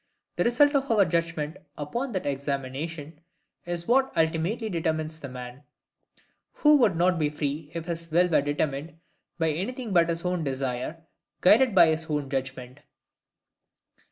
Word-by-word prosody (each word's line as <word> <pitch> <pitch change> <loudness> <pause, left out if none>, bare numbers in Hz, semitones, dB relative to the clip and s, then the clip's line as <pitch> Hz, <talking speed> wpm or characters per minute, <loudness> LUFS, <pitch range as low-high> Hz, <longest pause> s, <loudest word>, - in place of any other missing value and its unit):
The - - +2
result 285 +5 +4
of 275 -1 +1
our 210 -4 +4
judgment 165 -2 -2 0.2
upon 235 - -3
that 185 - -2
examination 140 +3 -4 0.5
is 175 -1 -3
what 265 +2 +3
ultimately 165 +8 0
determines 160 -3 -2
the 140 - -7
man; 125 +1 -9 0.9
who 300 -1 +5
could 210 -8 +3
not 175 +1 +2
be 150 -1 +1
FREE 145 0 -4
if 165 -1 -4
his 165 -1 -4
will 175 +3 +4
were 165 -4 +3
determined 145 +2 -2 0.4
by 165 -1 +1
anything 220 - -4
but 170 -2 +4
his 170 +1 -3
own 180 -2 -1
desire, 135 +4 -3 0.4
guided 225 +4 +5
by 170 -3 +7
his 160 0 -1
own 145 -2 -2
judgment. 130 -1 -4
165 Hz, 150 wpm, -26 LUFS, 145-180 Hz, 0.9 s, by